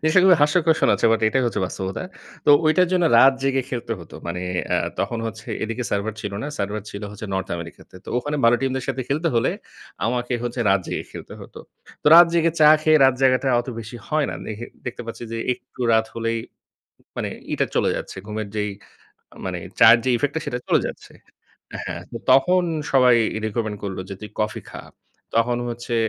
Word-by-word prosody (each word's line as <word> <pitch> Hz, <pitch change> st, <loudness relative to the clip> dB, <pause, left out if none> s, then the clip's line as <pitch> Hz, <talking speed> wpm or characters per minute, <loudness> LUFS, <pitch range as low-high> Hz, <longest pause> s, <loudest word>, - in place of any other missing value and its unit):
জিনিসটা 155 Hz, +4 st, +4 dB
খুবই 180 Hz, -3 st, +7 dB
হাস্যকর 160 Hz, +2 st, +3 dB
শুনাচ্ছে, -, -, +3 dB
বাট 115 Hz, -, +1 dB
এটাই 130 Hz, +4 st, +1 dB
হচ্ছে 115 Hz, -, -1 dB
বাস্তবতা। 95 Hz, -, -5 dB, 0.4 s
তো -, -, +7 dB, 0.2 s
ঐটার 170 Hz, +3 st, +4 dB
জন্য 180 Hz, -1 st, +3 dB
রাত 135 Hz, +2 st, +8 dB
জেগে 135 Hz, -1 st, +1 dB
খেলতে 120 Hz, -2 st, -3 dB
হত। 85 Hz, -, -13 dB, 0.2 s
মানে 90 Hz, +1 st, -4 dB, 0.3 s
অ্যা -, -, +1 dB, 0.2 s
তখন 115 Hz, -, -2 dB
হচ্ছে 110 Hz, 0 st, -8 dB, 0.2 s
এদিকে 115 Hz, +3 st, -3 dB
সার্ভার 100 Hz, +2 st, -1 dB
ছিল 100 Hz, -, -5 dB
না। 140 Hz, -, -3 dB
সার্ভার 105 Hz, +1 st, -3 dB
ছিল 100 Hz, -, -8 dB
হচ্ছে 105 Hz, +1 st, -8 dB
নর্থ 95 Hz, 0 st, -2 dB
আমেরিকাতে। 85 Hz, +2 st, -11 dB
তো -, -, -12 dB
ওখানে 145 Hz, +4 st, -3 dB
ভালো 120 Hz, +1 st, +6 dB
টিমদের 130 Hz, -1 st, -1 dB
সাথে 130 Hz, 0 st, -1 dB
খেলতে 155 Hz, +5 st, 0 dB
হলে, 115 Hz, -, +2 dB, 0.6 s
আমাকে 120 Hz, +1 st, -2 dB
হচ্ছে 120 Hz, 0 st, -3 dB
রাত 95 Hz, -1 st, +3 dB
জেগে -, -, -4 dB
খেলতে -, -, -9 dB
হত। -, -, -13 dB, 0.5 s
তো -, -, -9 dB
রাত 170 Hz, +1 st, +10 dB
জেগে 165 Hz, -1 st, +3 dB
চা 150 Hz, -, +8 dB
খেয়ে, 155 Hz, 0 st, +5 dB
রাত 135 Hz, -1 st, +5 dB
জাগাটা 130 Hz, +1 st, +3 dB
অত 120 Hz, -, -10 dB
বেশি 115 Hz, +2 st, -9 dB
হয় 155 Hz, -1 st, +1 dB
না। -, -, -5 dB
দেখে 110 Hz, +2 st, -6 dB, 0.2 s
দেখতে 120 Hz, -, -5 dB
পাচ্ছি 115 Hz, -, -7 dB
যে, -, -, -3 dB, 0.2 s
একটু 125 Hz, +1 st, -13 dB
রাত 110 Hz, 0 st, +3 dB
হলেই 115 Hz, 0 st, -1 dB, 0.8 s
মানে -, -, -3 dB, 0.2 s
ইটা -, -, +1 dB
চলে -, -, +2 dB
যাচ্ছে। -, -, -7 dB
ঘুমের 105 Hz, -1 st, -4 dB
যেই 105 Hz, -1 st, -1 dB, 0.7 s
মানে -, -, -3 dB, 0.2 s
চায়ের 115 Hz, 0 st, +8 dB
যে -, -, +2 dB
ইফেক্ট 145 Hz, +4 st, -1 dB
টা, -, -, 0 dB
সেটা 125 Hz, -, -3 dB
চলে -, -, +3 dB
যাচ্ছে। -, -, -10 dB, 0.7 s
হ্যা, -, -, -4 dB, 0.2 s
তো 115 Hz, -, -5 dB
তখন 180 Hz, +7 st, +4 dB, 0.3 s
সবাই 125 Hz, -3 st, +6 dB, 0.3 s
রিকমেন্ড 110 Hz, -1 st, -3 dB
করল 95 Hz, -2 st, -4 dB
যে, 100 Hz, -, -5 dB
"তুই 105 Hz, -, -8 dB
কফি 105 Hz, 0 st, -1 dB
খা।" -, -, -8 dB, 0.5 s
তখন 120 Hz, +1 st, +2 dB
হচ্ছে 120 Hz, 0 st, -4 dB
120 Hz, 195 wpm, -22 LUFS, 110-135 Hz, 0.8 s, রাত